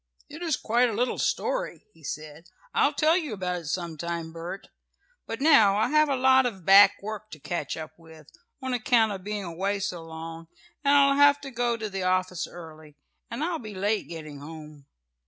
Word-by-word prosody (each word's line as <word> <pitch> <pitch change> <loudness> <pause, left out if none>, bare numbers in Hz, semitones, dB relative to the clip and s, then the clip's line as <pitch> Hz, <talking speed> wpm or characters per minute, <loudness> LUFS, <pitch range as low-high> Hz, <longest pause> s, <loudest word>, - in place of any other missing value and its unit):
"It 310 - -10
is 330 -5 0
quite 240 +2 +2
a - - -3
little 245 +4 -1
story," - - -2
he 165 - -22
said. 155 +3 -7 0.2
"I'll - - +3
tell 315 +1 +4
you 310 -10 -2
about 180 -3 -3
it - - -13
some 165 +1 -3
time, 170 -1 -4
Bert. 170 +4 -8 0.6
But 225 - -5
now 225 -10 +6
I 220 - +2
have 305 0 +4
a 275 - +2
lot 260 0 +4
of 190 -7 -7
back 200 +1 +8
work 215 0 -6
to 155 - -11
catch 150 -1 -4
up 155 0 -7
with, 160 -2 -15 0.4
on 260 -1 -2
account 230 -2 +3
of 190 -2 -6
being 205 0 -4
away 190 +4 -2
so 180 -3 -3
long, 165 0 -8 0.4
and 285 0 +4
I'll 275 0 +5
have 285 0 +6
to 275 -1 -8
go 240 -1 0
to 220 -1 -4
the 195 -2 -5
office 185 -1 0
early, 155 -3 -12 0.3
and 235 +6 -4
I'll 335 -1 -1
be 215 -4 -9
late 205 +3 -1
getting 155 -4 -8
home." 150 -1 -11
195 Hz, 200 wpm, -26 LUFS, 165-250 Hz, 0.6 s, back